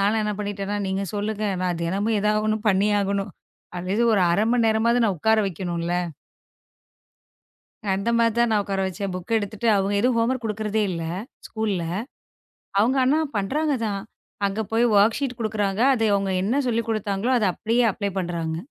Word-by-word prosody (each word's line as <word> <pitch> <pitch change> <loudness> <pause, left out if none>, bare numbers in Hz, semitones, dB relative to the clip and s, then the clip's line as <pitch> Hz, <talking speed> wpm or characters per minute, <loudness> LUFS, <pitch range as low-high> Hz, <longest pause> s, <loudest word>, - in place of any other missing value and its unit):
நானும் 210 +3 +2
என்ன 210 0 -1
பண்ணிட்டேன்னா, 205 0 -3
நீங்கச் 190 0 -2
சொல்லுங்க. 210 +1 -2 0.2
நான் 175 -2 -1
தினமும் 200 +5 0
எதாவது 210 +1 +1
1 215 0 +1
பண்ணியே 205 +2 +3
ஆகணும். 200 -1 -2 0.4
அது 180 +1 -5
இது 235 - +3
ஒரு 195 - +3
1/2 200 - +2
மணி 240 -2 +3
நேரமாவது 235 +2 +2
நான் 200 -4 +1
உக்கார 220 +5 +3
வைக்கணும் 175 -1 -4
இல்ல. 175 - -1 2.0
அந்த 195 +4 -2
மாதிரி 230 -1 +3
தான் 235 -1 +3
நான் 210 -1 +3
உக்கார 195 -1 -2
வச்சேன். 195 0 -4
புக் 185 +5 -3
எடுத்துட்டு 215 +2 -3
அவங்க 195 +1 0
எதுவும் 245 +2 +2
ஹோம் 230 +2 +2
ஒர்க் 255 -2 -4
குடுக்கறதே 215 0 -1
இல்ல 165 -2 -3 0.4
ஸ்கூல்ல. 215 -5 -2 1.0
அவங்க 250 +6 +2
ஆனா 295 +5 +3 0.2
பண்றாங்க 285 +9 0
தான். 200 -2 -2 0.5
அங்க 200 +2 -2
போய் 230 +2 +3
ஒர்க் 215 +5 +4
சீட் 260 -3 -3
குடுக்கிறாங்க. 210 -2 -1
அதை 225 -3 +1
அவங்க 195 -1 0
என்ன 235 +9 +1
சொல்லிக் 230 -1 -1
கொடுத்தாங்களோ 215 +2 -1
அதை 210 - +1
அப்படியே 235 +2 +1
அப்ளை 200 +1 -3
பண்றாங்க. 170 -3 -2
210 Hz, 175 wpm, -24 LUFS, 195-225 Hz, 2.0 s, ஒர்க்